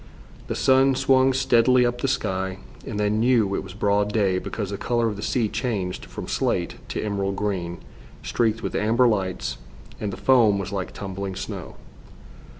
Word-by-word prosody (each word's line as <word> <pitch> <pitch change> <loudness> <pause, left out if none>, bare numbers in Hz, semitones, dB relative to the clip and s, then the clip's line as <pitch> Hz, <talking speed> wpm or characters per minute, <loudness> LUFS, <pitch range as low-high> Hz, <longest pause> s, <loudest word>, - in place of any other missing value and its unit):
The - - -3
sun 135 0 +4
swung 130 0 +4
steadily 125 -1 +4
up 120 0 -1
the - - +1
sky, 95 -6 -1 0.3
and 105 - -4
they 105 0 +2
knew 110 -2 +2
it - - -1
was 95 -1 -10
broad 105 0 +1
day 100 -4 +2
because 100 +1 -4
the 100 - -3
color 120 -1 +1
of 105 - -2
the 100 - -7
sea 115 0 0
changed 105 -5 -3
from - - -8
slate - - -1
to - - -3
emerald 100 -2 -1
green, 90 -4 -2 0.5
streaked 115 -1 0
with - - -3
amber 115 +4 +3
lights, 95 -5 -1 0.4
and 105 - -3
the - - -7
foam 115 -6 +4
was 95 -2 -4
like 95 -2 -3
tumbling 95 -1 -5
snow. - - -6
105 Hz, 175 wpm, -24 LUFS, 100-120 Hz, 0.5 s, sun